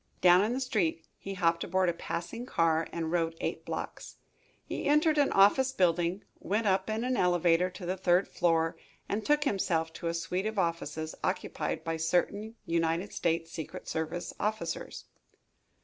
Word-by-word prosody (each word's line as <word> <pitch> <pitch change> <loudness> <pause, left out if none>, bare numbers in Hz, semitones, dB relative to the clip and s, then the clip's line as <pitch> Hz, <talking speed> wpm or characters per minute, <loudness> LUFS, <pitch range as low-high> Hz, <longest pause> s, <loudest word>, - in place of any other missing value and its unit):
Down 180 +1 +6
in 220 +3 0
the 260 - -1
street 195 -11 0
he 195 0 -6
hopped 170 -2 +2
aboard 185 +1 +1
a 175 - +2
passing 170 +7 -5
car 165 -5 +2
and 165 -1 -3
rode 165 -1 0
eight - - -3
blocks. - - -6 0.5
He - - -4
entered 300 +1 +4
an 285 - +3
office 230 +7 +5
building, 175 -3 +1 0.2
went 215 +3 -1
up 190 0 +2
in 220 +2 -1
an 255 +1 0
elevator 175 -2 +3
to 180 0 -9
the 185 +2 -2
third 180 +1 +3
floor, 165 -1 +1 0.3
and 215 +2 -2
took 295 +3 +3
himself 165 - 0
to 170 - -5
a 165 - -1
suite 180 +4 -2
of 220 -1 -4
offices 165 -3 -2
occupied - - -2
by 165 0 -2
certain 200 +7 0
United 165 +3 0
States 165 0 -1
secret 160 -3 -7
service 160 +2 -3
officers. 220 - -3
180 Hz, 165 wpm, -30 LUFS, 165-210 Hz, 0.5 s, Down